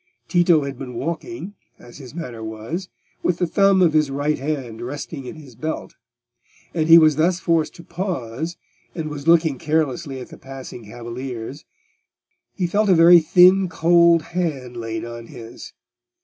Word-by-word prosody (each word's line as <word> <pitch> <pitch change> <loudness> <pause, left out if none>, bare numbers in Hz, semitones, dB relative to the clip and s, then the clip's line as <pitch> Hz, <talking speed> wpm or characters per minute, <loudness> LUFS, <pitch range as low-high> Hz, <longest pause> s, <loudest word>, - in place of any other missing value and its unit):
Tito 175 -4 +3
had 140 -2 -6
been 125 -3 -7
walking, 190 - -5 0.2
as 120 +3 -14
his 135 +1 -11
manner 125 -10 -6
was, 110 - -6 0.3
with 175 - 0
the 180 - +1
thumb 195 +1 +3
of 165 -3 +3
his 155 -2 +3
right 145 +2 -1
hand 130 -6 -4
resting 140 +2 -6
in 170 - -7
his 145 -5 -13
belt; 155 +7 -5 0.8
and 160 -2 0
as - - -4
he 165 - +10
was 155 -3 +5
thus 170 +3 +2
forced 165 -4 0
to 170 - -12
pause, 165 - -4 0.4
and 155 -3 -4
was 145 +1 -7
looking 160 -5 +4
carelessly 150 -2 -1
at 125 - -9
the - - -13
passing 130 -3 -10
cavaliers, 120 +4 -7 0.9
he 185 - -1
felt 205 +4 +1
a 185 - +6
very 170 +1 +8
thin 180 +3 +5
cold 170 0 +4
hand 150 -8 -3
laid 115 -1 -4
on 120 0 -8
his. 115 0 -11
155 Hz, 165 wpm, -21 LUFS, 125-170 Hz, 0.9 s, he